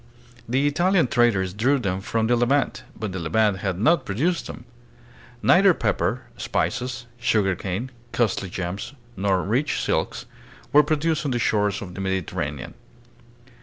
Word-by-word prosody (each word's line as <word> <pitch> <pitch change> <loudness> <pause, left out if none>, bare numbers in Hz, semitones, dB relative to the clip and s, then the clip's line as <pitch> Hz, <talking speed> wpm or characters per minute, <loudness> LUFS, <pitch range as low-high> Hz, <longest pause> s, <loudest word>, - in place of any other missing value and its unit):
The 135 +4 +2
Italian 175 +4 +3
traders 110 -7 +2
drew 125 +8 +2
them 95 -6 -2
from 110 +3 -1
the 120 +2 +3
Levant, 125 +3 +1 0.2
but 110 -3 -3
the 95 - -4
Levant 100 +5 +1
had 95 -3 -2
not 130 - +3
produced 160 - -1
them. 125 - -9 0.8
Neither 190 -1 +6
pepper, - - -1
spices, 120 -1 -2
sugarcane, 100 0 0 0.2
costly 105 -5 0
gems, 90 +8 -5 0.2
nor 95 -1 +1
rich 125 +9 0
silks, - - -1 0.5
were 150 - +8
pro 150 +1 0
duced 160 +1 0
on - - 0
the 125 - 0
shores 105 -3 +1
of 90 -2 -9
the 95 - -6
Mediterranean. 80 -7 -3
110 Hz, 145 wpm, -24 LUFS, 95-135 Hz, 0.8 s, were